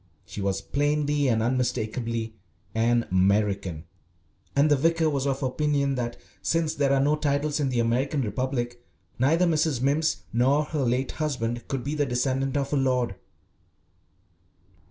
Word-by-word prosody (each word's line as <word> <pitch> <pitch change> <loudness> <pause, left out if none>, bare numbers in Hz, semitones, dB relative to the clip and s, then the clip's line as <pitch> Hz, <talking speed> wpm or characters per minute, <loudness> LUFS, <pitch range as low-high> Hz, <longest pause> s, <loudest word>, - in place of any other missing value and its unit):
She 105 - -7
was 100 -1 -1
plainly 145 0 0
and 115 -3 +2
unmistakably 115 -2 -1 0.4
an 115 +1 +2
American, 95 -3 +1 0.7
and 140 +2 +4
the - - +7
vicar 165 +3 +2
was 140 -1 -1
of 135 0 -1
opinion 140 +1 +1
that, 120 -2 -3 0.2
since 165 -2 0
there 140 -1 +1
are 140 - +3
no 145 +2 +3
titles 145 0 0
in 140 -2 +1
the 125 -2 +1
American 130 +5 0
Republic, 120 +2 -3 0.4
neither 160 +8 +3
Mrs. 155 -5 +1
Mimms 145 +5 +1
nor 135 +6 +3
her 150 -1 -2
late 130 +1 0
husband 120 -6 -3
could 135 -3 -3
be 145 - -3
the 145 -2 0
descendant 130 +2 0
of 140 +1 -2
a - - +3
lord. 125 -6 +1
135 Hz, 150 wpm, -26 LUFS, 120-145 Hz, 0.7 s, the